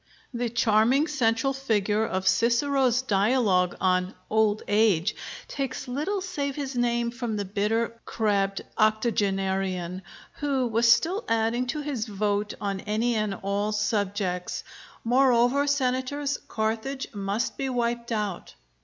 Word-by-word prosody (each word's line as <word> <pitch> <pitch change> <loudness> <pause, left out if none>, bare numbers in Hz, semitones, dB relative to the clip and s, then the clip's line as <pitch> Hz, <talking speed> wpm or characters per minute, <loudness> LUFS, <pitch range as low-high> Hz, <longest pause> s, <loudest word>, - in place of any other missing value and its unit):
The 240 0 -1
charming 230 +5 +3
central 265 -3 +1
figure 220 -5 0
of 190 -3 -2
Cicero's 250 +4 +2
dialogue 200 -4 +2
on 185 +1 +1 0.2
'Old 215 -1 +2
Age' 205 -3 +2 0.3
takes 270 -1 -4
little 305 +11 -2
save 290 -8 -3
his 275 -3 -4
name 235 -1 +1
from 240 -2 -3
the 205 -1 -2
bitter, 215 +4 -1
crabbed 200 -3 0 0.2
octogenarian, 195 -4 0 0.4
who 275 -3 0
was 230 0 +3
still 340 - +2
adding 230 +2 +1
to 300 +5 -2
his 275 -7 -3
vote 205 0 -1
on 200 -1 -2
any 220 +4 0
and 215 -3 -1
all 200 +2 0
subjects, 205 -3 -1 0.4
"Moreover, 250 +2 +3
Senators, 280 +1 0
Carthage 225 +5 -2
must 200 +3 -2
be 270 - -2
wiped 235 -1 -1
out." 210 -5 -3
225 Hz, 125 wpm, -26 LUFS, 205-255 Hz, 0.4 s, charming